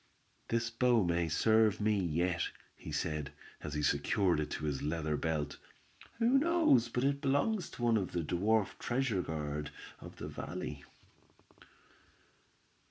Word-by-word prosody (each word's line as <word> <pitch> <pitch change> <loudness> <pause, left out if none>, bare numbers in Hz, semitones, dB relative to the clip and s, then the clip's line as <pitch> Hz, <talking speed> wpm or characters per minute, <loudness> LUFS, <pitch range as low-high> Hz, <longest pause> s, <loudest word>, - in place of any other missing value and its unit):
"This 115 0 0
bow 120 -1 +3
may 85 -1 +1
serve 110 +5 +3
me 105 0 +2
yet," 85 0 0 0.3
he - - -9
said, 75 -3 -2 0.3
as 75 -1 -5
he 75 - -1
secured 85 +5 +2
it 75 -1 -2
to 75 - -4
his 70 -3 -2
leather 75 0 -1
belt. 75 -2 -2 0.6
"Who 240 +4 +4
knows 310 - +3
but 125 +1 -1
it 140 0 +1
belongs 155 +9 +1
to 120 - -8
one 115 -2 +4
of 95 -4 -2
the 85 - -1
dwarf 100 +6 +1
treasure 120 -6 0
guard 75 -2 -4 0.3
of - - -11
the - - -6
valley." 75 -1 -6
95 Hz, 145 wpm, -33 LUFS, 75-120 Hz, 0.6 s, Who